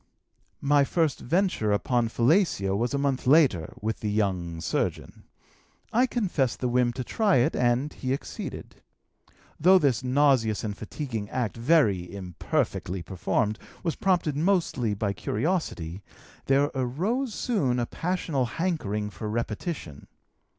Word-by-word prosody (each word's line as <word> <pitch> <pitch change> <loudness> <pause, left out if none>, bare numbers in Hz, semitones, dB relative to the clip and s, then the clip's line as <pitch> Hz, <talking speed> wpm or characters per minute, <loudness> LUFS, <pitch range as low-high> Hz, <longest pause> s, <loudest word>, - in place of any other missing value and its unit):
"My 145 0 +4
first 160 0 0
venture 170 - +1
upon 120 +3 +1
fellatio 120 - +2
was 120 +6 0
a - - +1
month 140 -2 -1
later, 130 - +4
with 110 +1 -2
the 105 - -2
young 95 -5 -1
surgeon. 80 - -3 0.7
I 245 +3 +4
confessed 175 - 0
the 125 - 0
whim 125 0 +2
to 130 +1 -4
try 205 - +2
it, 125 - +3
and 125 +4 +1
he 130 - -4
acceded. 135 - -5 0.8
Though 185 +5 +7
this 135 -7 +1
nauseous 130 -5 +2
and 105 -2 -3
fatiguing 110 -1 -5
act, 120 -4 -2
very 115 - +2
imperfectly 90 -1 -2
performed, 105 +4 -1 0.2
was 165 -3 -1
prompted 175 -6 +1
mostly 155 - +1
by 100 0 -1
curiosity, 105 - -2 0.5
there 140 +2 +3
arose 185 - -1
soon 150 - 0
a 120 - 0
passional 165 -4 -1
hankering 110 - -2
for 105 +4 -6
repetition. 110 - -4
125 Hz, 130 wpm, -27 LUFS, 105-160 Hz, 0.8 s, Though